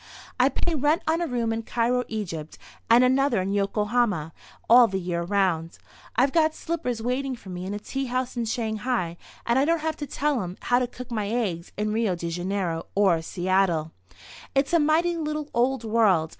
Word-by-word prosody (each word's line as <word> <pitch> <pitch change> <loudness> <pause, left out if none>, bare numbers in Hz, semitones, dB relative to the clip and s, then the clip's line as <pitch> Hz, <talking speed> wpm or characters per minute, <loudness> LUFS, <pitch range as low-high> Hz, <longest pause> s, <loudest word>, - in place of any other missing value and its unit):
I - - +5
pay 345 - -2
rent 300 +3 +1
on 325 +2 +1
a 340 - 0
room 235 -4 -1
in 225 - -2
Cairo, 240 +2 0
Egypt, 165 -8 -5 0.3
and 235 +2 +7
another 260 -2 +3
in 190 +2 -1
Yokohama 205 -4 0 0.3
all 240 +1 +8
the 190 - -2
year 175 -1 -2
around. 175 -3 0 0.4
I've 260 +4 +3
got 315 0 +2
slippers 250 -9 -3
waiting 260 +2 -1
for 205 -5 -13
me 180 +1 -5
in 200 - -3
a - - -4
tea 270 +5 -4
house 255 0 -2
in 235 -1 -1
Shanghai, 220 -5 -2 0.3
and 235 +2 +3
I 275 - +3
don't 330 0 +1
have 315 0 -2
to 290 - -5
tell 285 -4 0
'em 180 0 -6
how 245 0 +2
to 250 - 0
cook 250 0 -10
my 215 -3 -1
eggs 200 -8 -2
in 210 +1 -1
Rio 220 -4 +1
de 170 -1 -4
Janeiro 175 -1 -2
or 190 -5 +3
Seattle. 175 -2 0 0.6
It's 275 +4 +1
a 340 - +6
mighty 325 +3 +2
little 305 -1 -3
old 245 +1 +1
world. 210 -8 +3
230 Hz, 195 wpm, -25 LUFS, 190-265 Hz, 0.6 s, all